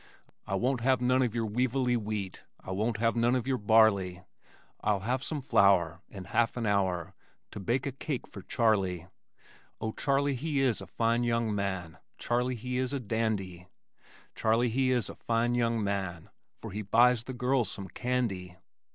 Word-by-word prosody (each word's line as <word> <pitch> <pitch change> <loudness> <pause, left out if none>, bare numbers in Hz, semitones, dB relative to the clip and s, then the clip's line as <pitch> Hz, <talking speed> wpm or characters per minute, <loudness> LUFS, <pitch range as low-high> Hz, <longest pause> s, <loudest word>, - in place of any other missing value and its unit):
I 100 - -1
won't 125 +5 0
have 130 +1 +3
none 125 +1 +3
of 120 -3 0
your 115 -1 0
weevilly 125 +3 +1
wheat 105 -4 -4 0.2
I - - -8
won't 110 +4 -1
have 115 +1 +1
none 120 +2 +3
of 125 -2 -1
your 130 -1 0
barley, 100 -4 +3 0.6
I'll 105 -2 +1
have 125 +6 -1
some 150 0 -3
flour 95 - +3
In 95 -3 -8
half 115 +6 0
an 120 - -1
hour 95 -5 0 0.4
To - - -7
bake 120 +7 -1
a 140 - -1
cake 135 0 -4
for 100 - -10
Charley. 95 -7 +1 0.7
Oh, 110 -1 -2
Charley, 140 +3 +1
he 145 +2 -1
is 130 -4 +1
a - - -9
fine 115 +1 +1
young 115 -2 0
man, 95 -5 -3 0.2
Charley 125 +1 0
he 125 +2 -3
is 130 +1 -1
a 140 - -1
dandy, 100 -6 -2 0.7
Charley 115 +2 +2
he 130 +3 +1
is 125 -5 +1
a - - -7
fine 115 +1 0
young 115 -2 +1
man 95 -4 -3 0.3
For - - -8
he 105 +3 -4
buys 120 +3 +4
the 130 - -5
girls 125 -3 +1
some 100 -1 -5
candy. 95 -4 -2
115 Hz, 175 wpm, -30 LUFS, 100-125 Hz, 0.7 s, buys